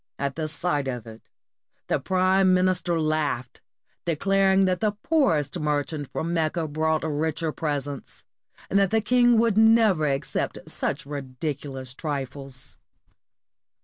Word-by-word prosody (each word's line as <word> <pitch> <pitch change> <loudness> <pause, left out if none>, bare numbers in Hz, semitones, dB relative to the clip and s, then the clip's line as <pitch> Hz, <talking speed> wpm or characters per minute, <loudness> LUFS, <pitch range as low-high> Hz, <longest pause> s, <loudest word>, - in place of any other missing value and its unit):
At 140 +2 -3
sight 150 -3 -1
of 125 -4 -4
it, 110 0 -11 0.6
the - - 0
prime 185 0 +3
minister 180 -2 +1
laughed, 155 -6 -1 0.4
declaring 195 +3 +2
that 185 -1 +1
the 210 -2 +1
poorest 175 - +2
merchant 150 -1 -2
from 170 +1 -2
Mecca 160 0 0
brought 155 +1 0
richer 160 +1 -1
presents, 145 -3 -4 0.4
and 200 - +2
that 195 -1 +3
the 220 - +2
king 240 +2 +4
would 225 -2 +3
never 220 -8 +5
accept 135 -1 -2
such - - -1
ridiculous 135 -1 -5
trifles. 135 -2 -5
160 Hz, 120 wpm, -25 LUFS, 145-190 Hz, 0.6 s, never